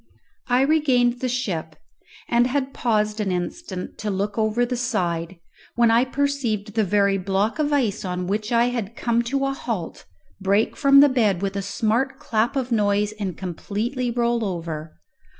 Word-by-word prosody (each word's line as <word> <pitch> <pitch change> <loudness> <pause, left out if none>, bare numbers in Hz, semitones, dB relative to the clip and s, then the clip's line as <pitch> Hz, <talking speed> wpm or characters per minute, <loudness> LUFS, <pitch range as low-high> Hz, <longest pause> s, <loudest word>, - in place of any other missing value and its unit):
I 250 +1 +3
regained 265 -5 +3
the 255 - -1
ship, 180 -11 -3 0.5
and 240 +1 +3
had 270 +1 -2
paused 215 -2 0
an 200 -3 0
instant 180 - -5
to 215 - -3
look 200 +1 -2
over 220 +2 +1
the 250 +1 -2
side, 180 -8 -2 0.4
when 235 -1 +4
I 235 +3 +4
perceived 255 -7 -1
the 220 0 +2
very 200 0 +2
block 195 - 0
of 300 -1 +1
ice 235 -8 +1
on 180 -1 -3
which 210 +4 -2
I 235 +1 +3
had 230 -3 -4
come 235 -1 +1
to 275 +3 0
a 275 - 0
halt 225 -10 -5 0.3
break 200 +3 +1
from 275 -1 +6
the 290 - +7
bed 210 -8 +1
with 195 0 -2
a 200 - -1
smart 225 +6 0
clap 240 -3 0
of 260 -2 -2
noise, 205 -1 +2
and 190 -5 -3
completely 215 +8 -3
roll 235 -1 0
over. 165 - -5
225 Hz, 170 wpm, -23 LUFS, 200-250 Hz, 0.5 s, the